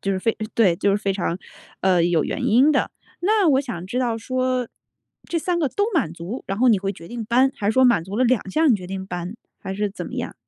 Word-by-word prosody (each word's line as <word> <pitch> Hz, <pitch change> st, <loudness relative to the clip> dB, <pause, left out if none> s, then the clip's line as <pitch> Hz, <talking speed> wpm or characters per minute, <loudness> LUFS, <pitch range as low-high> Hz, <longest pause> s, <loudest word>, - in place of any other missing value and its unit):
就 195 Hz, -, -2 dB
是 190 Hz, -, -1 dB
非 225 Hz, +4 st, 0 dB, 0.2 s
对， 195 Hz, -7 st, +4 dB
就 200 Hz, -, +1 dB
是 200 Hz, -, +3 dB
非 200 Hz, -2 st, -1 dB
常， 175 Hz, -2 st, -2 dB, 0.4 s
呃， 185 Hz, -3 st, +3 dB
有 170 Hz, -3 st, +2 dB
原 -, -, -2 dB
因 260 Hz, +8 st, +5 dB
的。 -, -, +1 dB, 0.3 s
那 405 Hz, 0 st, +3 dB
我 265 Hz, -1 st, +4 dB
想 225 Hz, -10 st, -6 dB
知 245 Hz, -, -3 dB
道 240 Hz, -3 st, 0 dB
说， 255 Hz, +1 st, -1 dB, 0.6 s
这 340 Hz, -, -1 dB
3 345 Hz, +1 st, -1 dB
个 295 Hz, -5 st, +1 dB
都 410 Hz, -, 0 dB
满 165 Hz, -, +1 dB
足， 180 Hz, +9 st, -6 dB
然 195 Hz, +2 st, -3 dB
后 255 Hz, +1 st, +4 dB
你 215 Hz, -4 st, +5 dB
会 195 Hz, +1 st, -2 dB
决 165 Hz, -3 st, -12 dB
定 235 Hz, +2 st, -6 dB
搬， 255 Hz, +4 st, +3 dB
还 200 Hz, -, -3 dB
是 -, -, +3 dB
说 260 Hz, +2 st, +4 dB
满 235 Hz, -9 st, +4 dB
足 190 Hz, +4 st, -6 dB
了 255 Hz, -, +3 dB
2 235 Hz, -5 st, +1 dB
项 315 Hz, +8 st, +3 dB
你 235 Hz, -, +5 dB
决 185 Hz, -2 st, -9 dB
定 190 Hz, 0 st, -5 dB
搬， 180 Hz, +4 st, -5 dB, 0.2 s
还 190 Hz, -, -6 dB
是 205 Hz, 0 st, -1 dB
怎 -, -, -7 dB
么 -, -, -8 dB
样？ -, -, -4 dB
220 Hz, 270 characters per minute, -22 LUFS, 190-255 Hz, 0.6 s, 因